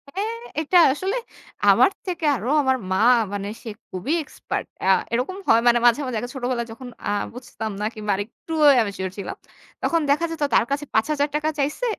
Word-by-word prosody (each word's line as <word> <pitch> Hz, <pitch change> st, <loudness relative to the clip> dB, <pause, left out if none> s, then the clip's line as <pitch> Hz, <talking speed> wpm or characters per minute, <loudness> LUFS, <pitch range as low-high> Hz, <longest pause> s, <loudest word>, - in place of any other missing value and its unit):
হ্যাঁ, 440 Hz, +4 st, -2 dB, 0.2 s
এটা 355 Hz, +4 st, +3 dB, 0.2 s
আসলে 380 Hz, +9 st, -2 dB, 0.5 s
আমার -, -, +6 dB, 0.2 s
থেকে 345 Hz, -3 st, -2 dB
আরো 235 Hz, 0 st, -5 dB
আমার 260 Hz, -1 st, +2 dB
মা 190 Hz, -, +2 dB, 0.4 s
মানে 200 Hz, 0 st, -3 dB, 0.2 s
সে 230 Hz, -, -6 dB, 0.2 s
খুবই 190 Hz, -, -3 dB
এক্সপার্ট। 300 Hz, -, -5 dB, 0.2 s
আ -, -, +1 dB, 0.3 s
এরকম 265 Hz, +11 st, -1 dB
হয় 225 Hz, +1 st, +5 dB
মানে 240 Hz, 0 st, +5 dB
মাঝে, 240 Hz, +4 st, +5 dB
মাঝে, 245 Hz, -3 st, -3 dB
আগে 245 Hz, -, -5 dB
ছোটবেলায় 245 Hz, -2 st, -2 dB
যখন 250 Hz, +2 st, -9 dB, 0.2 s
আ -, -, 0 dB, 0.2 s
বুঝতাম 220 Hz, -3 st, -6 dB
না -, -, 0 dB
কিংবা 210 Hz, -1 st, -3 dB
আরেকটু 220 Hz, +10 st, -7 dB, 0.2 s
আমি 255 Hz, -, +5 dB
ইমেচিউর 190 Hz, -2 st, -4 dB
ছিলাম। 195 Hz, -, -5 dB, 0.5 s
তখন 335 Hz, -, +2 dB
দেখা 300 Hz, +4 st, +3 dB
যেত 315 Hz, -2 st, -3 dB
তার 230 Hz, -, +5 dB
কাছে 290 Hz, +1 st, -1 dB
৳৫০০০ 285 Hz, +6 st, +1 dB
টাকা 305 Hz, +1 st, +1 dB
চাইছে। 295 Hz, -, -1 dB
255 Hz, 185 wpm, -23 LUFS, 220-305 Hz, 0.5 s, আমার